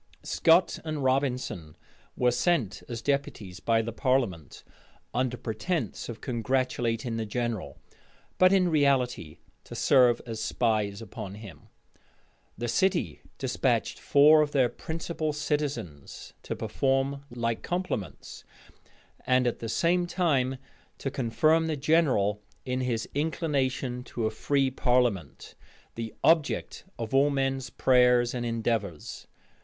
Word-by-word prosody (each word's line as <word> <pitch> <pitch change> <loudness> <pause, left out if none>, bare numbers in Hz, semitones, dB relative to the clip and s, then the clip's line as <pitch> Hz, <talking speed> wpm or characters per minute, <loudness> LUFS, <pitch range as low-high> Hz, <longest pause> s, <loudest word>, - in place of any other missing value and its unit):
Scot 165 +3 +3
and 155 -3 -3
Robinson 130 - -1 0.4
were 125 -1 +3
sent 125 - 0
as 115 -1 -5
deputies 125 -10 -2
by 115 -1 +2
the 115 - -4
parliament, 115 - -1 0.5
under 125 0 0
pretence 120 - -3
of 115 -2 -7
congratulating 120 -2 -1
the 110 - -2
general, 120 -1 -3 0.6
but 185 0 +6
in 185 -2 +4
reality 135 - +1 0.3
to - - -10
serve 125 -3 +4
as 115 -2 -5
spies 110 -3 0
upon 100 -2 -8
him. 105 -2 -12 0.9
The 120 +3 -3
city 170 - 0 0.2
despatched - - 0
four 150 +2 +6
of 150 -1 -1
their 130 -3 +3
principal 160 +3 -4
citizens 145 - -4
to - - -5
perform 135 +1 -1
like 115 -1 -2
compliments; 175 - -4 0.8
and 125 0 +3
at 120 - -1
the 115 - -5
same 175 +9 +1
time 135 -8 +1 0.4
to 135 - -4
confirm 155 +7 +2
the 155 -2 -1
general 135 -10 +2 0.2
in 130 0 -1
his 120 -3 -1
inclination 135 -5 -1
to 115 - -3
a 110 - 0
free 135 +4 0
parliament, 125 - 0 0.4
the 115 -1 -6
object 160 -2 +1
of 115 0 -5
all 140 +2 +5
men's 135 -2 -1
prayers 125 -1 +3
and 120 -1 -3
endeavors. 110 -7 -3
125 Hz, 125 wpm, -28 LUFS, 115-145 Hz, 0.9 s, but